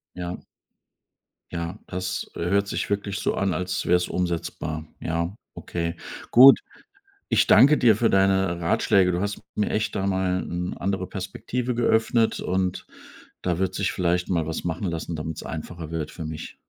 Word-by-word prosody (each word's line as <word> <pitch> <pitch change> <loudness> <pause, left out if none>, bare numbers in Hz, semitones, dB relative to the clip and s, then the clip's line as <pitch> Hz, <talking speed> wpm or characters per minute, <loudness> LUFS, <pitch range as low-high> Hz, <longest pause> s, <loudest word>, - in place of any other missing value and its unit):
Ja. 90 0 -4 1.1
Ja, 85 +3 -4
das, 95 +1 -4
äh, - - -7
hört 100 +1 +2
sich - - -3
wirklich 100 -1 -2
so - - 0
an, 95 -2 0
als 90 0 -2
wär's 90 0 +3
umsetzbar. 80 -3 -3
Ja, 85 +3 -2 0.2
okay. 85 0 -3 0.4
Gut, 135 +3 +9 0.7
ich - - +3
danke 150 +2 +7
dir 115 -4 +5
für 115 +2 +2
deine 95 -2 +2
Ratschläge. 90 +2 +3
Du 90 +1 -1
hast 100 0 -2 0.2
mir 105 - 0
echt 110 0 -1
da 95 - -1
mal 95 -1 0
'n 90 +1 -4
andere 95 -1 -2
Perspektive 115 +7 -3
geöffnet 115 -1 +2
und 95 0 -1 0.6
da 90 -2 -1
wird 95 0 0
sich 95 0 0
vielleicht 90 -2 0
mal 85 -4 +1
was 80 0 -4
machen 90 +3 -3
lassen, 85 0 -4
damit's 80 +1 -5
einfacher 80 0 -6
wird 80 -2 -3
für 80 - -7
mich. 80 0 -7
90 Hz, 160 wpm, -25 LUFS, 85-100 Hz, 1.1 s, Gut